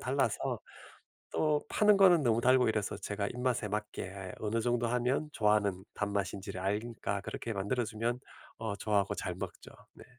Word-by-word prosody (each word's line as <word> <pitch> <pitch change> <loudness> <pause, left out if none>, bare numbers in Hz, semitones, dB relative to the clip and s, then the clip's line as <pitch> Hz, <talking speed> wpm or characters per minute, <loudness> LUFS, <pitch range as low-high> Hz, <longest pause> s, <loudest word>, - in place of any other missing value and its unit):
달라서 - - 0 0.7
또 150 -1 +2
파는 210 -1 +5
거는 185 -5 +7
너무 115 -3 +3
달고 130 0 +5
이래서 105 -2 -1
제가 100 0 -3
입맛에 125 -2 -1
맞게 100 -2 -4
어느 110 +2 0
정도 120 0 +1
하면 125 +5 0
좋아하는 105 -5 +2
단맛인지를 100 -2 -2
아니까 105 +1 -2
그렇게 115 - -4
만들어주면 115 +3 -1 0.4
어 110 -2 -3
좋아하고 100 -2 +1
잘 - - -3
먹죠. - - -7 0.2
네. - - -13
110 Hz, 335 characters per minute, -32 LUFS, 100-125 Hz, 0.7 s, 거는